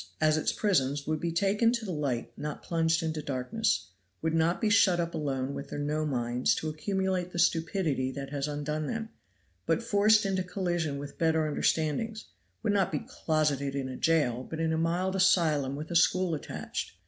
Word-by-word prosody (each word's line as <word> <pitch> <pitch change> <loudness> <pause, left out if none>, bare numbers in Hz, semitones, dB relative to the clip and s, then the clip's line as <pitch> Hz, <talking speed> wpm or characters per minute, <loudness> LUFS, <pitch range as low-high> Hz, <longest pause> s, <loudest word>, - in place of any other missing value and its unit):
as 155 -1 +4
its 155 - +1
prisons, 145 -8 +1
would 155 0 -1
be 170 +1 -2
taken 200 +6 +2
to 235 -2 -2
the 190 - -3
light 140 -7 -2
not 150 0 -5
plunged 165 0 +1
into 160 -1 -2
darkness; 130 - -1 0.3
would 160 0 -1
not 165 +2 +2
be 220 - +1
shut 205 -4 +4
up 170 0 -1
alone 140 -3 -2
with 140 0 -6
their - - -5
no 150 +1 -1
minds 120 -2 +1
to 160 - -3
accumulate 185 +3 -1
the 175 - -6
stupidity 165 -5 +1
that 135 0 -6
has 140 0 -2
undone 150 +1 -3
them, 225 -1 -3 0.6
but 230 - +1
forced 215 0 +4
into 190 -1 0
collision 175 -5 -2
with 145 0 -8
better 160 -1 +2
understandings; 160 +8 0 0.4
would 215 -2 +2
not 195 -3 +2
be 150 - -3
closeted 145 -3 0
in 135 -2 -2
a 130 - -6
jail, 145 -7 +2
but 160 +4 -7
in 160 0 +1
a - - +1
mild 175 +4 0
asylum 155 -8 +3
with 150 +3 -6
a - - -2
school 180 +1 +3
attached. 150 - -5
160 Hz, 190 wpm, -29 LUFS, 145-185 Hz, 0.6 s, as